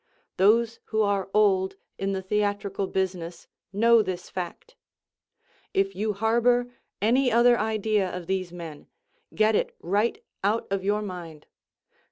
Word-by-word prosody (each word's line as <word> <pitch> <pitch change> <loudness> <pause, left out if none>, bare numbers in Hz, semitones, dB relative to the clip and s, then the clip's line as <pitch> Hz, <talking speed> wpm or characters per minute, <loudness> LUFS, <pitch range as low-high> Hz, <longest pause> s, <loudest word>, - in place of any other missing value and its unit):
Those 225 +4 +3
who 220 -1 +1
are 200 -2 0
old 195 -2 +3 0.2
in 195 0 -1
the 190 -1 -3
theatrical 200 0 -1
business 180 -3 -3 0.3
know 230 +3 +5
this 185 -3 -5
fact. 185 - -6 1.0
If 195 0 +2
you 210 +2 -1
harbor 240 +4 +2 0.3
any 250 +4 +3
other 240 +1 +5
idea 215 -2 0
of 180 -1 -6
these 185 -1 -2
men, 165 -4 -9 0.5
get 215 0 +3
it - - 0
right 205 +6 0 0.2
out 210 +3 +1
of 195 -1 -1
your 210 +2 0
mind. 170 -6 -8
200 Hz, 135 wpm, -26 LUFS, 190-220 Hz, 1.0 s, know